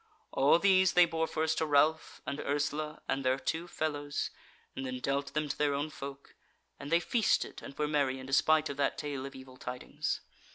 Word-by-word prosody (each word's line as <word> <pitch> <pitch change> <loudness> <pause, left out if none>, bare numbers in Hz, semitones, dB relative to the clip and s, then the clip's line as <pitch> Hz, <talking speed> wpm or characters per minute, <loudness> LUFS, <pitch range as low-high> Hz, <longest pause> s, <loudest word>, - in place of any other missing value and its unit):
All - - +5
these 190 0 +4
they 180 0 +7
bore 160 -1 -1
first 160 0 0
to 160 - +1
Ralph 150 +2 +2
and 140 +2 -3
Ursula, 145 +2 -2
and 135 0 0
their 130 0 +2
two 165 +5 -2
fellows, 145 -3 -2 0.4
and 135 - -4
then 130 -1 -3
dealt 140 +1 -2
them 150 0 +1
to - - -3
their 145 -1 +1
own 145 +2 -2
folk: 140 -1 -8 0.5
and 140 - -7
they 170 - +5
feasted 225 +4 +1
and 135 - -10
were 150 - +1
merry 140 -3 +1
in 130 - -8
despite 155 +3 +3
of 140 - -5
that 140 -1 +1
tale 140 -3 -4
of 135 - -11
evil 130 -1 -12
tidings. 125 0 -4
145 Hz, 200 wpm, -32 LUFS, 135-155 Hz, 0.5 s, they